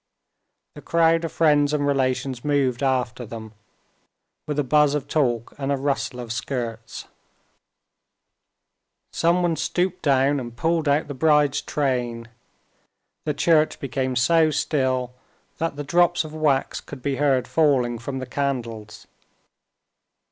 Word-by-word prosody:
The - - -11
crowd 165 0 +2
of 165 - -4
friends 150 -2 +3
and 145 -1 0
relations 130 -2 -1
moved 140 -4 +1
after 125 -2 0
them, 110 -1 -9 0.9
with 150 -1 -3
a 145 - +2
buzz 150 +1 +3
of 145 -1 -3
talk 120 -7 0
and 135 0 -2
a 140 - +1
rustle 135 -2 -2
of 120 -2 -5
skirts. 120 -3 -5 2.1
Someone 170 0 +2
stooped 180 +3 -1
down 140 0 +2
and 120 -2 -8
pulled 165 +1 0
out 145 +2 +2
the 145 - -5
bride's 150 0 +3
train. 125 -6 -2 1.0
The 150 - -1
church 155 +1 +2
became 130 -1 -2
so 160 +6 +4
still 130 -4 -1 0.5
that 165 -2 -1
the 145 - -5
drops 175 +4 +2
of 155 -1 -9
wax 150 -4 0
could 135 -3 -11
be 140 -2 -1
heard 135 -3 +2
falling 130 -7 +2
from 135 +3 -5
the 130 - -4
candles. 115 -6 -4
140 Hz, 135 wpm, -23 LUFS, 125-150 Hz, 2.1 s, so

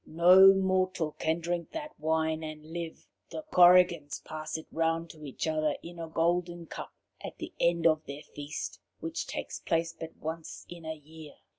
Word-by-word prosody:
No 180 +4 +8
mortal 185 -4 +1
can 160 +2 0
drink 170 0 -3
that 305 -2 -5
wine 160 0 0
and 155 0 -8
live. 170 -2 -6 0.2
The 315 - -6
Korrigans 175 -4 +6
pass 155 0 -5
it 160 - -9
round 165 0 0
to 155 -1 -14
each 140 -3 -4
other 155 -2 +1
in 170 0 -9
a 165 - -4
golden 170 +1 0
cup - - -8 0.3
at - - -7
the - - -7
end 170 -1 +2
of 155 -1 +3
their 140 +2 -7
feast, 145 +1 -6 0.2
which 330 0 -4
takes - - -5
place 165 -1 0
but 165 0 -9
once 160 +1 -6
in 175 -1 -10
the 160 0 -5
year. 155 0 -13
165 Hz, 175 wpm, -30 LUFS, 155-175 Hz, 0.3 s, No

